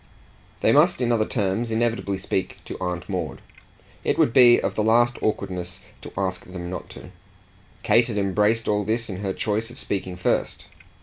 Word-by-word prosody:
They -, -, +4 dB
must 150 Hz, +7 st, +4 dB
in 120 Hz, -1 st, +1 dB
other 110 Hz, -2 st, +2 dB
terms 110 Hz, +1 st, -1 dB
inevitably 110 Hz, -3 st, 0 dB
speak 95 Hz, 0 st, -3 dB
to -, -, -6 dB
Aunt 90 Hz, -2 st, -3 dB
Maud -, -, -3 dB, 0.6 s
it -, -, 0 dB
would 115 Hz, -, +3 dB
be 120 Hz, -2 st, +7 dB
of -, -, -2 dB
the -, -, -1 dB
last 120 Hz, +2 st, +3 dB
awkwardness 90 Hz, -4 st, -3 dB, 0.2 s
to -, -, -9 dB
ask 95 Hz, -1 st, -2 dB
them 90 Hz, -1 st, -7 dB
not 90 Hz, -, -6 dB
to: -, -, -11 dB, 0.7 s
Kate 120 Hz, 0 st, +4 dB
had 115 Hz, -4 st, -3 dB
embraced 105 Hz, +3 st, +1 dB
all 105 Hz, 0 st, +1 dB
this 115 Hz, +2 st, -1 dB
in 95 Hz, -, -5 dB
her 100 Hz, 0 st, -2 dB
choice 110 Hz, +3 st, -2 dB
of 120 Hz, -, -12 dB
speaking 95 Hz, -2 st, -3 dB
first. 90 Hz, -, -1 dB
105 Hz, 180 wpm, -24 LUFS, 95-115 Hz, 0.7 s, be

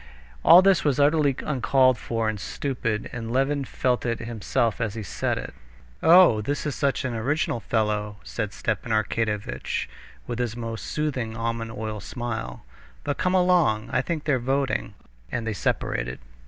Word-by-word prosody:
All 180 Hz, +2 st, +9 dB
this 195 Hz, -2 st, +4 dB
was 145 Hz, -2 st, +1 dB
utterly 145 Hz, -1 st, +3 dB
uncalled 130 Hz, -1 st, +3 dB
for 115 Hz, -2 st, -2 dB
and 110 Hz, -1 st, -2 dB
stupid, 115 Hz, -2 st, -3 dB
and 115 Hz, -1 st, -5 dB
Levin 135 Hz, +2 st, +1 dB
felt 125 Hz, 0 st, 0 dB
it 115 Hz, -1 st, -1 dB
himself 115 Hz, +1 st, -1 dB
as 110 Hz, -2 st, -2 dB
he 110 Hz, -, -4 dB
said -, -, -2 dB
it. -, -, -6 dB, 0.5 s
"Oh, 165 Hz, -10 st, +7 dB
this 145 Hz, +8 st, -2 dB
is 150 Hz, -, -1 dB
such 140 Hz, -1 st, 0 dB
an 125 Hz, -, -2 dB
original 125 Hz, +3 st, 0 dB
fellow!" 105 Hz, -2 st, -1 dB
said 105 Hz, -3 st, -4 dB
Stepan 110 Hz, +2 st, -3 dB
Arkadyevitch 105 Hz, -, -1 dB, 0.4 s
with 120 Hz, -1 st, -4 dB
his 120 Hz, -1 st, -2 dB
most 115 Hz, -2 st, -5 dB
soothing, 130 Hz, -7 st, -2 dB
almond 115 Hz, 0 st, -2 dB
oil 110 Hz, -1 st, -4 dB
smile. 115 Hz, -, -5 dB, 0.4 s
"But 145 Hz, -, -2 dB
come 185 Hz, +1 st, +1 dB
along; 175 Hz, -12 st, +3 dB
I 125 Hz, -, +3 dB
think 155 Hz, +1 st, -3 dB
they're 140 Hz, -4 st, +1 dB
voting...." 135 Hz, +2 st, -1 dB, 0.4 s
And 120 Hz, -2 st, -2 dB
they 110 Hz, -, -1 dB
separated. -, -, -1 dB
120 Hz, 160 wpm, -25 LUFS, 110-140 Hz, 0.5 s, All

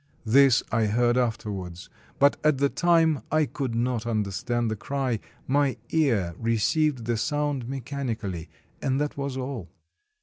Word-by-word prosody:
This 130 Hz, +2 st, +5 dB
I 110 Hz, -1 st, +2 dB
heard 120 Hz, +3 st, +2 dB
afterwards; 105 Hz, -8 st, -2 dB, 0.3 s
but, 140 Hz, +1 st, +5 dB
at 155 Hz, -2 st, +4 dB
the 140 Hz, +1 st, +2 dB
time, 165 Hz, -4 st, +3 dB
I 155 Hz, 0 st, +3 dB
could 130 Hz, -4 st, -4 dB
not 120 Hz, -1 st, -1 dB
understand 115 Hz, +2 st, -1 dB
the -, -, -1 dB
cry; 130 Hz, 0 st, -2 dB, 0.3 s
my 140 Hz, -1 st, +1 dB
ear 115 Hz, -, +2 dB
received 115 Hz, +4 st, +1 dB
the 120 Hz, 0 st, 0 dB
sound 145 Hz, 0 st, -1 dB
mechanically, 120 Hz, -, -4 dB, 0.3 s
and 135 Hz, 0 st, 0 dB
that 150 Hz, 0 st, -1 dB
was 140 Hz, -1 st, -3 dB
all. 130 Hz, -8 st, -5 dB
125 Hz, 140 wpm, -26 LUFS, 110-140 Hz, 0.3 s, This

